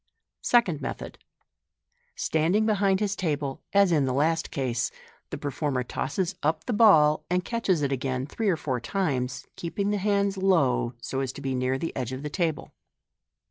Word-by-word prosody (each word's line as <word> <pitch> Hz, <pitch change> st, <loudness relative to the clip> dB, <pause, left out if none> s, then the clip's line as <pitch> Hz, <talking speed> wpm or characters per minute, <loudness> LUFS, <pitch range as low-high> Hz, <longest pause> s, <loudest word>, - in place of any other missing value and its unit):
Second 185 Hz, -12 st, +3 dB
Method. -, -, -6 dB, 0.5 s
— -, -, -46 dB
Standing 170 Hz, +7 st, +2 dB
behind 200 Hz, -3 st, +2 dB
his 205 Hz, -1 st, 0 dB
table, 145 Hz, -7 st, -2 dB
as 200 Hz, -2 st, +4 dB
in 150 Hz, -4 st, +3 dB
the 130 Hz, -1 st, -1 dB
last 160 Hz, +3 st, +1 dB
case, 125 Hz, -4 st, -1 dB, 0.4 s
the -, -, -5 dB
performer 140 Hz, -2 st, -2 dB
tosses 170 Hz, +9 st, -2 dB
up 155 Hz, +2 st, 0 dB
the 245 Hz, -, -1 dB
ball, 160 Hz, -9 st, +5 dB
and 180 Hz, 0 st, 0 dB
catches 195 Hz, -9 st, 0 dB
it 140 Hz, -, 0 dB
again 130 Hz, -1 st, -1 dB
three 210 Hz, +8 st, -1 dB
or 175 Hz, -, +2 dB
four 130 Hz, -5 st, -2 dB
times, 130 Hz, -, -2 dB
keeping 200 Hz, +4 st, -2 dB
the 210 Hz, -, +1 dB
hands 200 Hz, 0 st, +1 dB
low, 140 Hz, -10 st, +2 dB
so 135 Hz, -, -3 dB
as 135 Hz, -2 st, -1 dB
to -, -, -9 dB
be 135 Hz, -1 st, -2 dB
near 130 Hz, +1 st, 0 dB
the 165 Hz, -, -4 dB
edge 130 Hz, -1 st, -3 dB
of 130 Hz, +2 st, -6 dB
the 150 Hz, -, -4 dB
table. 165 Hz, -4 st, -2 dB
155 Hz, 180 wpm, -26 LUFS, 135-195 Hz, 0.5 s, ball